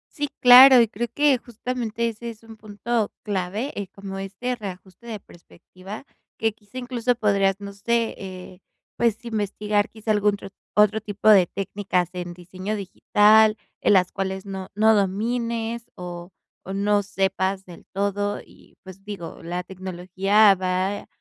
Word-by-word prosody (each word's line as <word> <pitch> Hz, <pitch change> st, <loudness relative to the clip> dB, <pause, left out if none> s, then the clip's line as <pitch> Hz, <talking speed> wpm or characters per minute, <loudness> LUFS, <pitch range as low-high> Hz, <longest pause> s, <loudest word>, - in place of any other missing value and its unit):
Sí, 290 Hz, -3 st, -2 dB
claro, 255 Hz, +1 st, +10 dB
y 230 Hz, -, +4 dB
creo 235 Hz, +3 st, -4 dB
que, 290 Hz, -3 st, +4 dB
justamente, 235 Hz, -1 st, -3 dB
ese 230 Hz, +1 st, -6 dB
es 225 Hz, -1 st, -13 dB
un 225 Hz, -1 st, -13 dB
punto 215 Hz, +1 st, -2 dB
clave. 205 Hz, +6 st, -3 dB
Eh, 200 Hz, -, -6 dB
como 195 Hz, 0 st, -8 dB
este 200 Hz, +6 st, -4 dB
reajuste 190 Hz, 0 st, -10 dB
de 220 Hz, -3 st, -6 dB
perspectiva, 185 Hz, +6 st, -12 dB, 0.3 s
que 225 Hz, 0 st, +1 dB
quizá 210 Hz, +3 st, -12 dB
incluso 245 Hz, -1 st, -1 dB
podrías, 200 Hz, -3 st, +1 dB
no 200 Hz, 0 st, -7 dB
sé, 230 Hz, +3 st, -1 dB
eh, 185 Hz, -1 st, -9 dB, 0.4 s
pues, 230 Hz, -1 st, 0 dB
investigar, 210 Hz, -1 st, -1 dB
quizá, 220 Hz, 0 st, -6 dB
algún 210 Hz, -1 st, +2 dB
tro 200 Hz, -, -10 dB, 0.3 s
otro 210 Hz, +1 st, +4 dB
tipo 210 Hz, 0 st, -1 dB
de 195 Hz, -4 st, +7 dB
técnicas 195 Hz, -1 st, -2 dB
en 175 Hz, -1 st, -5 dB
diseño 185 Hz, +4 st, -6 dB
digital, 210 Hz, +2 st, +4 dB, 0.2 s
en -, -, +3 dB
las 180 Hz, -1 st, +3 dB
cuales 190 Hz, 0 st, -4 dB
no 190 Hz, -1 st, -6 dB
no 220 Hz, +1 st, +5 dB
domines 230 Hz, +3 st, -1 dB
o 175 Hz, 0 st, -8 dB, 0.3 s
o 190 Hz, -, -6 dB
no 205 Hz, +1 st, +1 dB
sepas 195 Hz, -1 st, -1 dB
del 175 Hz, -2 st, -13 dB
todo. 200 Hz, +1 st, -1 dB
Y, -, -, -21 dB
pues, 190 Hz, +1 st, -13 dB
digo, 195 Hz, -6 st, -8 dB
la 175 Hz, +2 st, -4 dB
tecnología 190 Hz, +3 st, +2 dB
va 185 Hz, +2 st, -2 dB
205 Hz, 155 wpm, -23 LUFS, 190-225 Hz, 0.4 s, claro